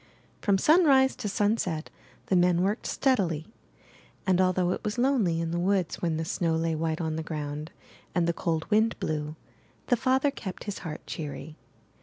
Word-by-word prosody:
From 200 -2 +3
sunrise 275 - +5
to 210 - -3
sunset 200 -6 0 0.3
the 190 - +1
men 175 0 +4
worked 205 +4 -1
steadily; 180 - +1 0.8
and 185 -1 +3
although 185 -1 +2
it - - -3
was 210 0 -2
lonely 240 -10 +2
in 165 0 -2
the 170 - -1
woods 185 -1 0
when 165 -2 0
the 160 - -2
snow 165 -1 0
lay 165 0 0
white 160 0 -1
on 160 -2 -2
the - - -2
ground 150 -1 -5 0.5
and 175 -2 +3
the 170 - +1
cold 165 -2 -1
wind 220 +2 +3
blew, 150 0 -3 0.5
the 245 - +5
father 265 +3 +2
kept 190 -9 -7
his 205 -2 -5
heart 160 -3 -7
cheery. 150 0 -6
175 Hz, 175 wpm, -28 LUFS, 160-210 Hz, 0.8 s, sunrise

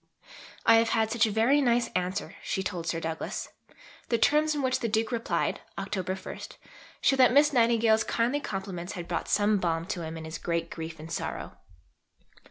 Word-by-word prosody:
"I 230 - +7
have 230 0 +3
had 220 0 +1
such 230 -1 +3
a - - -2
very 235 +7 +3
nice 240 -2 +2
answer," 185 +2 -3
she 190 - -2
told 175 -3 -4
Sir 165 -1 -1
Douglas. 160 0 -4 0.6
The 235 - +2
terms 300 +5 +3
in 285 - -2
which 255 0 +1
the 235 - -1
Duke 220 +2 0
replied 235 -1 -1 0.2
(Oct. 190 -1 -3
1) - - -8 0.4
show 270 - +4
that 255 -2 +6
Miss 290 +3 +5
Nightingale's 230 -2 +4
kindly 240 +5 0
compliments 190 -7 -5
had 175 -3 -6
brought 170 - -3
some 210 0 +3
balm 165 -2 -1
to 175 -1 -4
him 160 0 -5
in 160 - -7
his 160 +1 -6
"great 170 -1 -2
grief 160 -1 -6
and 160 +2 -9
sorrow." - - -4
210 Hz, 185 wpm, -28 LUFS, 170-235 Hz, 0.6 s, I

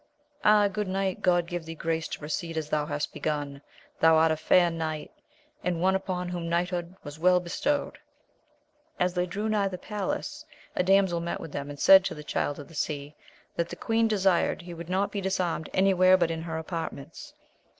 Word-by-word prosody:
Ah, 210 -1 +6
good 210 0 -3
knight! 190 0 -1
God 175 -2 +3
give 175 0 -4
thee 165 0 -7
grace 160 0 -2
to - - -5
proceed 160 +2 -4
as 155 -1 -3
thou 150 -1 0
hast 145 0 -3
begun! 145 -2 -3 0.4
thou 160 0 +6
art 160 0 +4
a - - +2
fair 175 +2 +3
knight, 160 -2 -4 0.5
and 175 -1 -1
one 190 +2 +3
upon 185 -2 -2
whom 175 -1 -4
knighthood 175 +1 -1
was 145 +1 -9
well 180 +2 +5
bestowed. 280 +11 -2 1.0
As 180 0 +1
they 180 0 0
drew 200 +4 -3
nigh 210 -2 +1
the 185 -1 -5
palace, 205 +1 -4 0.3
a - - +2
damsel 190 -2 +3
met 170 0 -3
them, 140 0 -5
and 145 -1 -8
said 190 +3 +8
to - - -2
the 150 - -9
Child 145 -1 -2
of 145 - -9
the - - -16
Sea, 145 -1 -3 0.4
that 170 0 0
the - - -6
queen 225 0 +1
desired 190 -4 +1
he 175 0 -8
would 170 0 -8
not 190 +2 0
be 200 - -3
disarmed 180 -4 -1
any 195 +1 +3
where 185 0 +6
but 170 -2 +1
in 165 0 -3
her 165 -1 -4
apartments. 165 - -6
175 Hz, 200 wpm, -27 LUFS, 160-190 Hz, 1.0 s, said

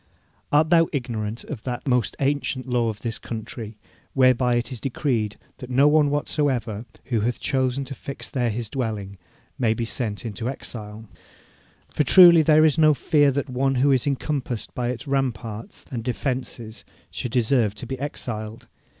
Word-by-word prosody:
Art 155 +2 +4
thou 165 -1 +5
ignorant 115 -5 -3
of 135 -8 -7
that 125 +2 -5
most 125 -3 +1
ancient 135 -2 -1
law 120 -2 +1
of 110 -1 -6
this 115 -2 -4
thy - - -16
country, 110 -1 -6 0.4
whereby 130 -2 +4
it 120 +2 -1
is 125 - -5
decreed 120 -5 -1 0.2
that 125 - -9
no 135 +3 +4
one 150 -1 +4
whatsoever, 130 -6 -1 0.2
who 120 -4 -1
hath 115 +3 -1
chosen 130 0 0
to 135 - -7
fix 135 +1 -7
there 125 -3 -1
his 115 +1 -3
dwelling, 105 -6 -4 0.4
may 115 -3 +2
be 115 - -2
sent 115 -2 -3
into 115 +2 -3
exile? 110 -4 -8 0.8
For - - +1
truly 170 +2 +8
there 155 0 +5
is 155 0 +2
no 155 -1 +6
fear 145 -1 +3
that 140 +1 -1
one 135 +1 0
who 135 +3 +3
is 130 0 +2
encompassed 135 -4 -2
by 120 -1 -2
its 125 +3 -5
ramparts 120 -5 -3
and 120 -3 -4
defences 125 -3 -4 0.3
should 125 - -4
deserve 115 -3 +2
to - - -7
be 130 +1 -5
exiled. 110 -6 -5
125 Hz, 170 wpm, -24 LUFS, 115-140 Hz, 0.8 s, truly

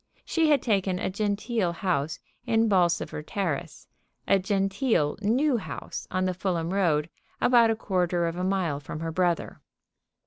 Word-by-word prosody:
She 325 -2 +2
had 290 -4 +3
taken 195 -5 +1
a 185 - -2
genteel 205 -1 -1
house 160 -4 -1 0.3
in 225 -1 +3
Bolsover 175 -6 +1
Terrace, 170 -1 -4 0.4
a 195 - +4
genteel 195 - +1
new 250 +6 +2
house 205 - -6
on 185 0 0
the 185 - 0
Fulham 175 -2 -2
Road, 160 -6 +2 0.3
about 235 -2 +5
a 225 - +2
quarter 180 -4 0
of 165 0 -2
a 180 - -3
mile 185 -6 0
from 150 +2 -7
her 165 0 -3
brother. 175 0 -1
185 Hz, 150 wpm, -27 LUFS, 170-210 Hz, 0.4 s, about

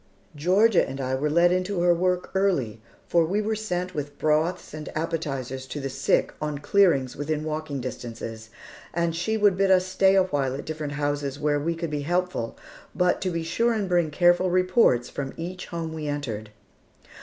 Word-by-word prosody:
Georgia 185 +7 +4
and 135 - -6
I 130 -1 -2
were 140 +3 0
led 170 +3 +4
into 185 0 0
her 175 0 +5
work 180 +1 0
early, 160 - 0 0.3
for 170 -1 +3
we 185 +6 0
were 215 +1 0
sent 185 -4 -3
with 145 -2 -5
broths 155 +4 0
and 155 0 -6
appetizers 135 -5 -3
to 145 - -5
the 135 -1 -4
sick 135 +1 +1
on 150 -1 -2
clearings 145 -5 +3
within 150 +1 -2
walking 155 -3 -3
distances; 115 -3 -7 0.5
and 170 -1 0
she 200 +6 -1
would 205 -3 +4
bid 195 +1 +2
us 185 -1 +5
stay 190 +1 +3
a 190 - +5
while 140 -7 -1
at 140 - -6
different 155 -2 -4
houses 145 -1 -2
where 145 -1 +1
we 165 +3 -1
could 165 -1 -4
be 150 -1 -2
helpful, 175 -7 -1 0.4
but 180 -1 +2
to 185 - 0
be 165 -2 -2
sure 230 +8 +1
and 210 -3 -1
bring 175 -3 +2
careful 175 +3 +3
reports 185 - +3
from 135 -1 -5
each 180 +3 -6
home 165 -2 -4
we 155 -2 -5
entered. 120 -8 -4
160 Hz, 190 wpm, -25 LUFS, 145-180 Hz, 0.5 s, her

